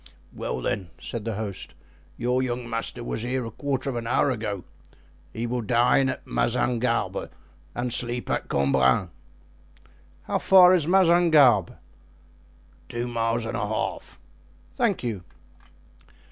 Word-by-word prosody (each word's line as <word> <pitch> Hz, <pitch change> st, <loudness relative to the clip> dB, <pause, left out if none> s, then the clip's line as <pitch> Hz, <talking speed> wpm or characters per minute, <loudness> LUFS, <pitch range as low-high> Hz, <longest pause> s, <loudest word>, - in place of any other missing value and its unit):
"Well, 65 Hz, -, -4 dB
then," 95 Hz, -, -2 dB
said 115 Hz, -3 st, -6 dB
the 115 Hz, -2 st, -2 dB
host, 100 Hz, -3 st, -6 dB, 0.4 s
"your 125 Hz, +2 st, 0 dB
young 125 Hz, -1 st, -3 dB
master 115 Hz, +1 st, -3 dB
was 115 Hz, -, -4 dB
here 125 Hz, +1 st, -2 dB
a 115 Hz, -, -6 dB
quarter 135 Hz, +2 st, -3 dB
of 135 Hz, -, -2 dB
an 115 Hz, -1 st, -4 dB
hour 130 Hz, +3 st, +2 dB
ago; 105 Hz, -6 st, -4 dB, 0.7 s
he 115 Hz, -, -4 dB
will 120 Hz, +1 st, -2 dB
dine 125 Hz, +4 st, +3 dB
at -, -, -5 dB
Mazingarbe 115 Hz, -, 0 dB, 0.5 s
and 120 Hz, -1 st, -2 dB
sleep 120 Hz, 0 st, -2 dB
at -, -, -2 dB
Cambrin." 70 Hz, +5 st, +2 dB, 1.1 s
"How -, -, -1 dB
far 185 Hz, -1 st, +7 dB
is 165 Hz, -5 st, +2 dB
Mazingarbe?" 165 Hz, -, +5 dB, 1.1 s
"Two 120 Hz, +1 st, -3 dB
miles 115 Hz, -1 st, -1 dB
and 115 Hz, -, -4 dB
a 105 Hz, +1 st, -2 dB
half." 95 Hz, -3 st, -4 dB, 0.6 s
"Thank -, -, 0 dB
you." 110 Hz, -7 st, -3 dB
120 Hz, 130 wpm, -25 LUFS, 105-130 Hz, 1.1 s, far